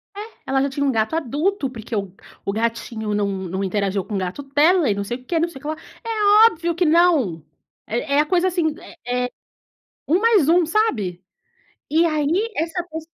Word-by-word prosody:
É, - - -7 0.3
ela 270 0 +2
já 280 - +1
tinha 280 +1 -2
um 275 - +2
gato 225 +5 0
adulto, 310 - -1
porque 230 -2 -7
o 200 -3 -3 0.3
o 200 - 0
gatinho 225 -1 -2
não 205 -1 +1
não 190 -1 -3
interagiu 195 0 -1
com 210 - -6
o - - +1
gato 185 +7 -3
dela, 295 +3 +3
e 205 - +1
não 200 - -2
sei 240 +5 -4
o 255 - -19
quê, 330 +4 0
não 335 +1 +1
sei 275 - -11
o - - -23
que 295 - -7
lá. 310 - -2 0.3
É 435 0 +5
óbvio 335 -1 -3
que 350 +1 +1
não. 305 - +3 0.4
É 240 +5 -1
é - - +5
a 300 - +4
coisa 360 +2 +2
assim, 335 -4 0 0.3
eh 250 0 0
eh, - - -4 0.8
1 340 +6 +2
mais 430 -9 +4
1, 345 +1 +5
sabe. 220 - 0 0.7
E 320 +3 +3
aí, 330 +8 0
essa 330 +3 -1
pes 320 0 -6
285 Hz, 215 wpm, -21 LUFS, 220-340 Hz, 0.8 s, É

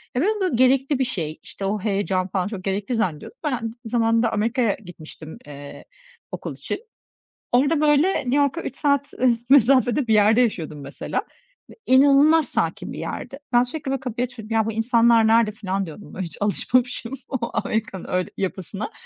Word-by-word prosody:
ya, 250 - +1
ben 355 - +2
onu 370 - 0
gerekli 265 +2 +3
bir - - +3
şey, 160 -10 -4
işte, 195 - -6
o 205 +2 -1
heyecan 195 -2 -1
falan 185 -1 -1
çok 205 -3 -6
gerekli 200 +5 -2
zannediyordum. 185 - -3
Ben 300 - 0
aynı 230 -3 -3
zamanında 230 0 +2
Amerika'ya 225 0 +1
gitmiştim, 160 -2 -10
eee, 145 -1 -10 0.5
okul - - -5
için. - - -4 0.7
Orada, 285 +5 +3
böyle, 300 +5 +4
New 255 0 -1
York'a 285 +3 +1
3 - - -6
saat 280 -1 0 0.4
mesafede 260 -1 +4
bir 220 - +3
yerde 215 +3 +5
yaşıyordum 160 - -2
mesela. 140 0 -4 0.5
E - - -12
inanılmaz 285 +4 +5
sakin - - -2
bir - - -7
yerdi. 275 - -6
Ben 240 0 +6
sürekli, 270 +3 -5
böyle, 270 - -1
kapıyı 245 -2 -3
açıyordum. 230 -3 -8
"Ya, 220 - +3
bu 225 - -1
insanlar 230 0 +4
nerede?" 225 -1 +4
filan 195 -2 -3
diyordum. 170 +5 -11
Böyle 190 - -4
hiç 165 - -9
alışmamışım 245 +4 0 0.2
o 265 - -2
Amerika'nın 215 -4 -2
öyle 180 0 -1
yapısına. 195 +2 -4
230 Hz, 175 wpm, -23 LUFS, 195-265 Hz, 0.7 s, Ben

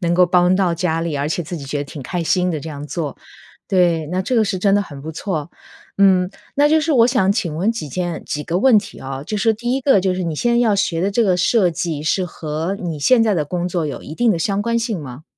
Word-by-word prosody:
能 170 -2 0
够 180 +1 +5
帮 180 0 +3
到 180 -3 +1
家 165 -1 -1
里。 165 -2 -3
而 140 +1 -1
且 170 +2 -1
自 160 - -7
己 145 - -7
觉 140 - -3
得 145 - -3
挺 140 0 -9
开 175 +7 -3
心 180 +2 +1
的 160 - -2
这 155 +3 -8
样 145 -1 -7
做， 150 -3 -4 0.5
对。 170 -4 +2
那 180 +4 -2
这 255 - -2
个 225 - +4
是 195 -2 -1
真 195 +1 +3
的 205 - +3
很 145 -8 -8
不 160 +2 -6
错， 160 -3 -4 0.5
嗯， 185 -2 +4 0.3
那 290 +1 +4
就 315 0 +4
是 320 - -1
我 235 -3 +5
想 245 -7 +2
请 175 -7 -1
问 185 +8 +1
几 200 -10 -5
件 175 +1 -3
几 150 - -3
个 170 +3 -2
问 235 +1 +5
题 200 - -7
啊， 135 0 -6
就 210 +8 -4
是 220 +3 +2
第 240 +3 -3
一 - - 0
个 265 -7 +4
就 185 0 0
是 185 - -3
你 165 -3 -2
现 240 +10 0
在 235 - +3
要 225 -4 +3
学 170 -4 0
的 195 - +1
这 235 +4 +2
个 185 -4 +2
设 185 0 +3
计 165 -3 -3
是 180 +4 +1
和 160 +2 -4
你 165 -4 -4
现 235 - +4
在 220 -2 +2
的 155 -4 0
工 175 +4 -3
作 175 -2 -1
有 140 - -6
一 155 - -8
定 235 +4 +2
的 170 - -2
相 200 +4 0
关 235 +1 0
性 225 -5 -2
吗？ 130 +2 -9
180 Hz, 300 characters per minute, -19 LUFS, 160-205 Hz, 0.5 s, 够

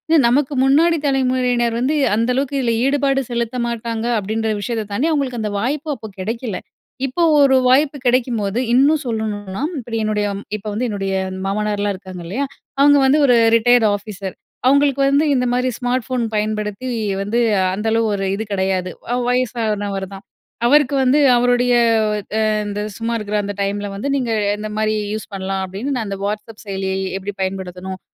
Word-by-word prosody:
"அ - - +6
நமக்கு 270 +4 +2
முன்னாடி 320 +5 +4
தலைமுறையினர் 250 -3 +1
வந்து, 265 +5 +1 0.2
அந்த 230 +3 0
அளவுக்கு 280 +1 -1
இதுல 240 -3 +1
ஈடுபாடு 275 -1 +2
செலுத்த 235 +1 -2
மாட்டாங்க." 230 -1 -3
அப்படீன்ற 220 +2 -2
விஷயத்த 220 -1 -3
தாண்டி, 275 +11 +1
அவங்களுக்கு 265 -6 -1
அந்த 210 -1 -2
வாய்ப்பு 290 +7 -2
அப்போ 220 - -9
கெடைக்கல. 225 +1 -3 0.5
இப்போ 270 +6 -1 0.2
ஒரு 270 -1 +5
வாய்ப்பு 285 +3 +3
கெடைக்கும்போது 235 -4 +1
இன்னும் 290 +4 +4
சொல்லணும்ன்னா, 210 -1 -3 0.2
இப்படி 230 -2 -5
என்னுடைய 210 -1 0 0.3
இப்ப 210 - -17
வந்து 240 +4 -1
என்னுடைய 195 -2 -2 0.3
மாமனார்லாம் 205 0 -1
இருக்காங்க 185 -1 -9
இல்லையா? 250 +11 -2 0.3
அவங்க 285 +1 +6
வந்து 270 +3 +4
ஒரு 250 -3 +5 0.2
ரிட்டயர்ட் 235 0 +4
ஆஃபீசர். 200 -2 -7 0.3
அவங்களுக்கு 280 0 +3
வந்து 285 +3 +3
இந்த 250 -2 +1
மாரி 250 +1 +1
ஸ்மார்ட் 245 -1 -1
ஃபோன் 255 -2 -1
பயன்படுத்தி, 210 +2 -2 0.3
வந்து 210 +4 0 0.3
அந்தளவு 220 +3 0
ஒரு 195 -1 -2
இது 215 - -3
கெடையாது. 190 -2 0 0.2
அவ் 250 - 0
வயசானவர் 215 -6 -1
தான். 195 +1 -10 0.4
அவருக்கு 285 +2 +4
வந்து 260 +3 +4 0.2
அவருடைய, 245 0 +2 0.6
அ - - +2 0.3
இந்த 205 0 -4 0.2
சும்மா 230 +1 -2
இருக்குற 210 -1 -4
அந்த 205 0 -4
டைம்ல 205 +1 -1
வந்து, 200 +7 -4
"நீங்க 250 -4 -1 0.3
இந்த 215 +1 -5
மாரி 215 0 +1 0.2
யூஸ் 215 0 -6
பண்ணலாம்." 190 0 -3
அப்படீன்னு 200 +10 -4
நான் 225 -4 -2
அந்த 195 0 -4
WhatsApp 210 +1 -5
செயலிய 190 -1 -3 0.2
எப்படி 195 +1 -5
பயன்படுத்தணும்? 190 0 -4
230 Hz, 160 wpm, -19 LUFS, 205-255 Hz, 0.6 s, அ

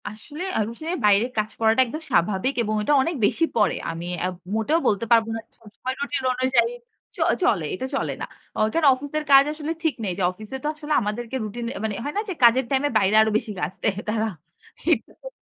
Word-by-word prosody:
আসলে 290 - -8 0.2
আউসে 230 +8 -4 0.2
বাইরে 205 +2 +5
কাজ 215 0 +1
করাটা 225 +2 +4
একদম 305 +7 -6
স্বাভাবিক 195 +8 +2
এবং 215 -1 -1
ওইটা 210 +8 +1
অনেক 330 +5 -1
বেশি 330 +10 +2
পড়ে। 210 -4 +3 0.2
আমি 165 +1 -6 0.2
আ - - +2 0.3
মোটেও 225 +10 +2
বলতে 210 +3 +1
পারব 230 -1 +6
না - - -3
যে - - -49
সবসময় 230 +4 -6
রুটিন 285 -1 -2
অনুযায়ী 260 - +2 0.4
চ - - -17 0.3
চলে 195 - +2
এটা 255 - -4
চলে - - -1
না। - - -2 0.3
অ - - -2
কেন 330 -2 +2
অফিসের 285 +4 -4
কাজ 275 0 +9
আসলে 305 +1 -4
ঠিক 320 -3 +1
নেই 190 -4 -1
যে, 195 - -1
অফিসে 215 +7 -9
তো - - -1
আসলে 305 0 -3
আমাদেরকে 230 +4 -4
রুটিন 225 +3 -5
এ - - -5
মানে 215 -2 -1
হয় 290 - -4
না - - +2
যে - - -1
কাজের 240 +2 +6
টাইমে 275 +2 +2
বাইরে 200 0 +2
আরো 220 - +3
বেশি 220 0 -5
কাজ - - -2
দেয় 200 - +1
তারা। 220 0 0 0.6
এটাতো - - -2
230 Hz, 210 wpm, -24 LUFS, 210-285 Hz, 0.6 s, কাজ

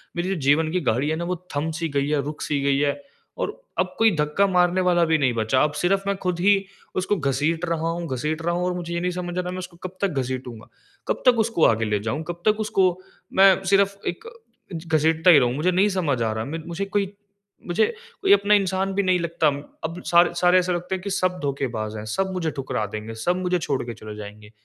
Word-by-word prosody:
मेरी 175 +2 -2
जो 195 - 0
जीवन 155 +4 +3
की 180 - +1
गाड़ी 135 +3 0
है 160 - 0
ना 170 - -3
वो 180 +1 -1 0.2
थम 155 +3 -1
सी 165 -1 -2
गई 140 0 0
है, 150 -2 +1
रुक 150 +1 -6
सी 145 -2 -1
गई 140 0 +2
है। 145 -1 +2 0.4
और - - -1 0.3
अब - - 0
कोई 225 0 +5
धक्का 150 +6 +2
मारने 180 0 +2
वाला 175 -1 +3
भी 160 0 +3
नहीं 130 -4 +1
बचा, 115 +3 +1
अब 150 - +1
सिर्फ़ 195 +2 +2
मैं 200 - +1
ख़ुद 180 -2 -1
ही 195 +1 +3 0.3
उसको 185 +3 0
घसीट 150 +4 0
रहा 165 -1 -1
हूँ 170 0 -3
घसीट 155 +5 -2
रहा 170 - +1
हूँ, 180 0 -1
और 180 - 0
मुझे 170 -1 -5
ये 170 - -1
नहीं 180 - 0
समझ 180 0 -5
आ - - +1
रहा 180 - -5
है - - -3
मैं 185 - -5
उसको 180 -2 -9
कब 185 0 -7
तक 200 - +2
घसीटूँगा। 125 -3 -6 0.4
कब - - -1
तक 245 -2 +5
उसको 220 -7 +2
आगे 110 0 +3
ले 105 -1 0
जाऊँ? 130 +9 -3
कब 175 0 -6
तक 215 0 +3
उसको 190 -4 +2 0.4
मैं 195 0 +5
सिर्फ़ 200 +1 +3
एक 450 - -4 0.6
घसीटता 160 +2 +3
ही 150 - +8
रहूँ? 125 -2 +1
मुझे 170 +5 +1
नहीं 190 +4 +3
समझ 140 -8 0
आ 110 - 0
रहा। 110 +1 -3
म 160 +3 -5
मुझे 195 +3 -2
कोई 200 0 -1 0.5
मुझे 175 +5 +3 0.4
कोई 400 0 +5
अपना 210 - +4
इंसान 195 -1 +1
भी 200 - +1
नहीं 185 -1 +2
लगता। 170 -2 0 0.4
अब 165 +3 -4
सारे 175 0 +4
सारे 180 +1 +4
ऐसे 180 0 0
लगते 180 +2 -2
हैं 185 - -6
कि 200 - -3
सब 185 -1 0
धोखेबाज़ 120 -6 -3
हैं, 105 - -6
सब 190 - -1
मुझे 165 -4 -1
ठुकरा 130 -5 -3
देंगे, 110 +2 -6
सब 175 +11 0
मुझे 180 -1 0
छोड़ 140 -3 -1
के 120 - -5
चले 110 -1 -9
जाएँगे। 105 0 -10
170 Hz, 245 wpm, -23 LUFS, 140-185 Hz, 0.6 s, ही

